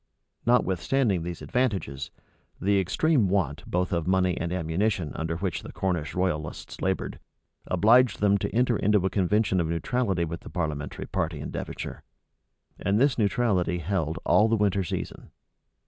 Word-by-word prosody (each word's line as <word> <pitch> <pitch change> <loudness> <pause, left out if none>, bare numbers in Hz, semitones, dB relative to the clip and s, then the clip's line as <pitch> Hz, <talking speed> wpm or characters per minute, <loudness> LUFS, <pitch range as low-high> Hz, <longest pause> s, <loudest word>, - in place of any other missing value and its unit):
Notwithstanding 110 -2 +2
these 85 +1 -6
advantages, 100 - -1 0.5
the 100 +1 +2
extreme 120 - +2
want 85 -5 0
both 90 0 0
of 85 -1 -1
money 95 -1 +2
and 85 0 -3
ammunition 90 0 -1
under 80 +1 -3
which 90 -1 -2
the - - -9
Cornish 85 -6 -2
royalists 90 -5 -3
labored, - - -2 0.5
obliged 110 +6 +4
them 100 -1 +3
to - - -2
enter 120 +1 +2
into 105 -2 +2
a 95 - +1
convention 100 0 +2
of 80 - -1
neutrality 90 +2 0
with 85 +1 -5
the - - -11
parliamentary 75 -4 -3
party 80 -5 -2
in 75 - -6
Devonshire; - - -6 0.8
and 100 +2 +1
this 135 -1 +3
neutrality 100 -5 +1
held 85 -2 -1
all 105 - +5
the 115 0 +2
winter 100 -2 +2
season. 85 - -5
95 Hz, 150 wpm, -27 LUFS, 85-105 Hz, 0.8 s, all